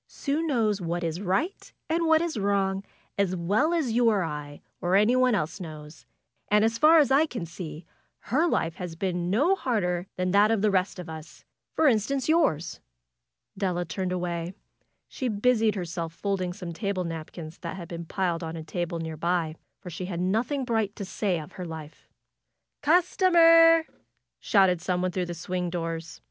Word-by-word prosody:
'^Sue 295 +3 -2
knows 225 - +1
what 175 0 -2
is 165 +2 -3
right 205 - -2 0.2
and 330 +1 0
what 320 0 +4
is 340 -4 -3
wrong, 195 -1 0 0.4
as 190 -2 +1
well 205 - +1
as 320 -8 0
you 235 +1 +4
or 205 -4 +2
I, 150 -2 -6 0.2
or 180 0 +1
anyone 245 +4 +4
else 160 0 -2
knows. 155 -4 -10 0.4
And 210 +1 +4
as 225 +1 0
far 315 +2 +7
as 290 -4 +4
I 295 +4 +5
can 235 - -5
see 165 -1 -8 0.5
her 315 +6 +4
life 165 - -1
has 175 -3 -6
been 175 0 -2
no 285 - +3
harder 185 - -1
than 185 0 -1
that 205 +2 +5
of 220 -2 +1
the 210 - +3
rest 190 0 0
of 180 -1 -7
us; 160 0 -10 0.3
for 320 - +2
instance 255 +2 +1
yours.^^ 310 - +1 0.8
Della 180 -3 -1
turned 185 -1 -3
away. 175 0 -3 0.5
She 260 - -4
busied 220 0 +2
herself 170 -3 -4
folding 185 0 -2
some 175 -2 -7
table 195 0 -2
napkins 165 0 -7
that 170 +1 -5
had 170 -3 -7
been 170 0 -6
piled 175 -1 -1
on 165 0 -5
a 160 - -6
table 175 +1 -3
nearby, 165 0 -2 0.3
for 180 -3 -8
she 185 - -5
had 175 -2 -4
nothing 230 +9 0
bright 220 -4 -1
to 200 - -5
say 190 -2 -1
of 150 - -9
her 180 - -7
life. 160 -2 -9 0.7
'^Customer 330 0 +6 0.6
shouted 190 -5 +3
some 180 0 -1
one 185 - 0
through 180 0 -2
the 175 - -5
swing 180 +1 -3
doors. 165 -1 -4
185 Hz, 180 wpm, -27 LUFS, 170-230 Hz, 0.8 s, far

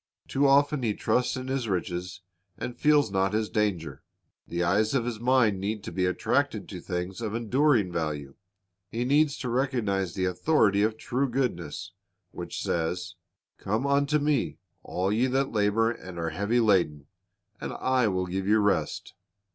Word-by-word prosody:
Too 140 +1 +2
often 145 +1 +4
he 110 -4 0
trusts 125 +1 0
in 130 0 -5
his 130 -3 -1
riches, 90 0 -3 0.4
and 120 - -5
feels 150 -7 +3
not 95 +1 +1
his 110 0 -1
danger. 90 -10 -1 0.5
The 85 +1 -1
eyes 105 +7 +2
of 120 -4 +1
his 120 -3 -3
mind 120 -5 +3
need 105 +2 -3
to - - -6
be 90 +1 0
attracted 90 - 0
to - - -6
things 90 +4 -4
of 110 -1 -3
enduring 120 -3 +2
value. 75 -5 -3 0.6
He 120 +3 -2
needs 145 +2 +3
to 125 - -4
recognize 115 - 0
the 95 - 0
authority 100 - +2
of 110 +1 +1
true 130 +4 -1
goodness, 115 - -2 0.4
which - - -6
says, 90 +2 -2 0.5
"Come 110 +7 -1
unto 140 +1 +2
Me, 145 -2 0 0.2
all 95 +2 -2
ye 120 +4 +2
that 135 +1 0
labor 110 +2 +2
and 95 -6 -9
are 85 -1 -2
heavy 100 +8 +1
laden, 90 -10 +2 0.5
and - - -4
I 130 -3 +1
will 95 -2 0
give 95 +2 -3
you 105 +1 +5
rest. 100 -8 0
105 Hz, 165 wpm, -27 LUFS, 90-130 Hz, 0.6 s, you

